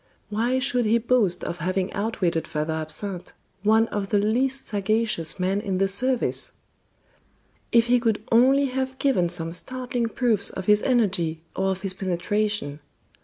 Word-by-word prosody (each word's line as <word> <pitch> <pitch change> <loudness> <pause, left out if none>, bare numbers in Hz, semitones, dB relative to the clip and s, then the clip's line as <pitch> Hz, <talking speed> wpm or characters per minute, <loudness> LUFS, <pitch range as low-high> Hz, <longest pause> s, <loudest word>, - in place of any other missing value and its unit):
Why 235 +5 +1
should 250 -2 +1
he 220 +2 +3
boast 225 -6 +1
of 170 - -4
having 185 +3 -2
outwitted 195 -6 -1
Father 155 +1 -2
Absinthe, 165 +4 -5 0.3
one 220 +2 +3
of 200 -1 -3
the 210 - +2
least 255 +6 0
sagacious 205 -5 -1
men 190 +2 0
in 195 -3 -2
the 195 +1 +2
service? 250 +6 +1 1.2
If 235 -1 +5
he 245 +1 +3
could 225 -3 0
only 265 +4 +5
have 260 0 -3
given 215 -13 +1
some 165 0 -1
startling 250 +3 -2
proofs 225 -5 +1
of 190 - -6
his 210 +1 +4
energy 185 -10 0
or 190 0 0
of 190 0 -2
his 195 -1 -1
penetration! 190 -3 -2
210 Hz, 155 wpm, -24 LUFS, 185-240 Hz, 1.2 s, If